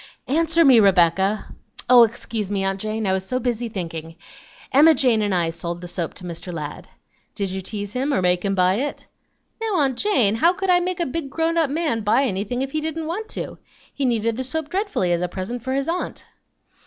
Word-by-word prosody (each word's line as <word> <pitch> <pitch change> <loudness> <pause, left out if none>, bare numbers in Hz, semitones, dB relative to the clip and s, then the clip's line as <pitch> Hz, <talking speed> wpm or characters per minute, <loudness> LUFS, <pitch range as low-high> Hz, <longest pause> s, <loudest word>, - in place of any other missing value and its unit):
"Answer 325 +3 +2
me, 260 -4 +7
Rebecca." 190 +1 +3 0.3
"Oh! 250 -1 +8
excuse 220 -2 -2
me, 200 -1 -1
aunt 195 0 -1
Jane, 215 0 -2
I 190 - +2
was 190 0 -1
so 255 +6 -2
busy 240 -1 -2
thinking. 165 -5 -6 0.6
Emma 310 +4 +6
Jane 245 -5 +3
and 205 -1 0
I 170 -3 +1
sold 170 +1 -5
the 175 - -8
soap 175 -2 -4
to - - -9
Mr. 175 +1 -6
Ladd." 150 -3 -6 0.5
"Did 200 -3 -2
you 190 0 -3
tease 205 +1 -5
him, 265 +3 -1
or 275 - +2
make 180 -1 +2
him 195 -1 0
buy 185 +1 +3
it?" 285 +4 -4 0.6
"Now, 445 -3 -1
aunt 270 -7 +1
Jane, 260 - +3
how 335 +11 +3
could 380 0 0
I 355 - +5
make 360 0 -2
a 345 - +1
big 280 +1 -4
grown 325 +3 0
up 325 -4 +2
man 295 -6 -1
buy 210 +6 +3
anything 215 +2 -2
if 270 - -5
he 310 - -1
didn't 320 +1 -3
want 390 +8 -4
to? - - -5 0.3
He 280 - -3
needed 230 -2 0
the 260 - -2
soap 300 +4 -4
dreadfully 385 - -1
as 170 0 +1
a 180 - 0
present 195 +7 -5
for 260 +3 -3
his 275 +1 -1
aunt." 345 +2 -3
230 Hz, 220 wpm, -22 LUFS, 190-300 Hz, 0.6 s, Oh